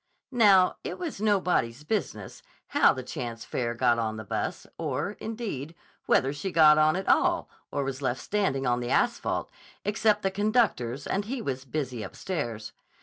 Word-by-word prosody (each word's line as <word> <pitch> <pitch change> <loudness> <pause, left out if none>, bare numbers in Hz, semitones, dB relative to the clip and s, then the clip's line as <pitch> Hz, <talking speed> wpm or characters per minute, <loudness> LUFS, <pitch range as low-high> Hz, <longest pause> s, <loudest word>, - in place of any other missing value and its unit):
Now, 200 -6 +5
it - - -5
was 325 - -5
nobody's 180 - +1
business 150 - -3 0.3
how - - +5
the 130 - -5
chance 115 -2 -6
fare 120 -2 -2
got 120 0 +3
on 110 -1 -2
the 110 - -6
bus, 100 - -3
or, 145 +9 -2
indeed, 205 - -5 0.3
whether 135 +1 +3
she 185 +6 -4
got 155 -2 +7
on 155 0 +4
at 190 +1 -3
all - - +2 0.2
or 140 - -1
was 135 0 -4
left 130 -1 -1
standing 190 -10 -1
on 120 -1 +2
the 120 0 -4
asphalt, - - 0 0.3
except 210 0 +2
the 195 - +1
conductor's 195 - +1
and 200 +1 -1
he 255 +4 -3
was 130 - -4
busy 130 -3 -3
upstairs. 120 - -4
145 Hz, 165 wpm, -27 LUFS, 125-200 Hz, 0.3 s, got